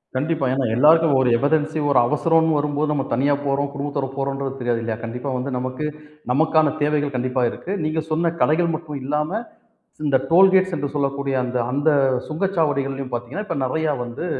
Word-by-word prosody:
கண்டிப்பா. 145 +2 0
ஏன்னா, 135 -1 0
எல்லாருக்கும் 150 +2 +5
ஒரு 125 - +2
எமர்ஜென்சி 155 +3 +1
ஒரு 130 -3 +4
அவசரோன்னு 160 +3 +2
வரும்போது, 145 +1 0
நம்ம 140 -2 0
தனியா 140 +4 +2
போறோம். 140 0 0
குடும்பத்தோட 140 -1 -3
போறோம்ன்றது 135 0 -3
தெரியாது 120 -2 -1
இல்லயா? 115 -1 -3
கண்டிப்பா 125 +4 -5
வந்து 130 +2 -4
நமக்கு, 130 +4 -4 0.5
நமக்கான 155 +1 +3
தேவைகள் 145 -2 0
கண்டிப்பா 125 +1 -1
இருக்கு. 190 - -7
நீங்க 155 +1 -1
சொன்ன 165 +1 +1
கடைகள் 165 +2 +2
மட்டும் 150 -3 -6
இல்லாம, 150 +4 -1 0.8
இந்த 135 - +3
டோல்கேட்ஸ் 185 +1 +5
என்று 145 - -2
சொல்லக்கூடிய 140 -1 -1
அந்த 125 0 -2
அந்த 145 +4 +1 0.4
சுங்கச்சாவடிகள்லயும் 145 -7 -1
பாத்தீங்கன்னா, 125 - -5
இப்ப 165 - -2
நெறைய 155 +3 0
வந்து 120 +8 -6
145 Hz, 160 wpm, -21 LUFS, 135-160 Hz, 0.8 s, எல்லாருக்கும்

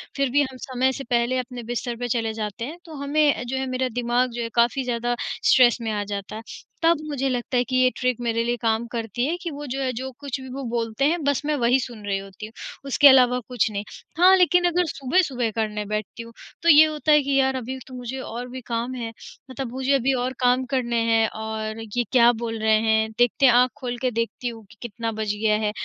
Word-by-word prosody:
फिर 275 -1 +1
भी 290 +3 +4
हम 260 -2 -3
समय 260 0 0
से 275 - -6
पहले 240 +1 +1
अपने 250 -1 -6
बिस्तर 240 +1 -3
पे 245 - -2
चले 225 -2 -1
जाते 220 +1 -4
हैं, 310 +6 -7
तो 325 - -11
हमें 290 +1 +2
अ, - - -6
जो 250 +2 -3
है 265 - -1
मेरा 255 0 -1
दिमाग 245 +1 0
जो 235 0 -4
है 230 - -3
काफ़ी 235 +3 +2
ज़्यादा 240 -1 -1 0.3
स्ट्रेस 245 -2 +5
में 225 -1 -2
आ 205 -1 -1
जाता 200 0 -6
है। 220 - -6 0.4
तब 335 0 +5
मुझे 275 -2 -1
लगता 250 0 -2
है 245 - +3
कि 255 +1 -4
ये 255 0 +5
ट्रिक 250 -2 0
मेरे 230 -1 0
लिए 240 +1 0
काम 225 0 +1
करती 235 +1 -2
है 320 +5 0
कि 345 -2 -4
वो 290 +1 -7
जो 270 0 -4
है, 260 -1 0
जो 260 +3 -5
कुछ 280 -2 -4
भी 260 - -9
वो 275 +1 -5
बोलते 230 +2 -1
हैं 325 +2 +1
बस 285 -1 +1
मैं 305 - +1
वही 245 +1 +3
सुन 235 -4 -7
रही 200 -1 0
होती 195 +2 -10
हूँ, 220 - -12 0.3
उसके 280 +1 +6
अलावा 250 -2 +6
कुछ 245 -3 0
नहीं। 200 -1 -3 0.3
हाँ, 365 +2 +7
लेकिन 360 -1 +4
अगर 350 +1 +1
सुबह-सुबह 270 -5 0
करने 210 -2 -2
बैठती 215 +2 -4
हूँ, 230 0 -13 0.3
तो 340 - +4
ये 310 0 +9
होता 310 0 -1
है 300 0 +6
कि 275 0 0
यार 265 0 +2
अभी 260 +1 -4
तो 260 - -12
मुझे 250 +1 -6
और 245 -1 -6
भी 260 +1 -7
काम 235 +2 -2
है, 235 -2 -4 0.4
मतलब 260 -2 -5
मुझे 265 +1 0
अभी 270 0 +2
और 255 +1 -2
काम 250 0 +2
करने 240 -3 0
हैं 225 0 +4
और 220 0 -5 0.2
ये 240 - +3
क्या 240 -2 +6
बोल 225 -1 -3
रहे 220 0 +4
हैं 220 0 +2
देखते 245 +3 +3
हैं, 250 - +7
आँख 250 +1 +4
खोल 245 -3 -4
के 255 -1 +1
देखती 230 +2 -3
हूँ 225 -2 -10
कि 225 - -18
कितना 230 0 -4
बज 210 -1 -1
गया 215 -1 +3
है। 210 - +1
245 Hz, 245 wpm, -23 LUFS, 230-265 Hz, 0.4 s, ये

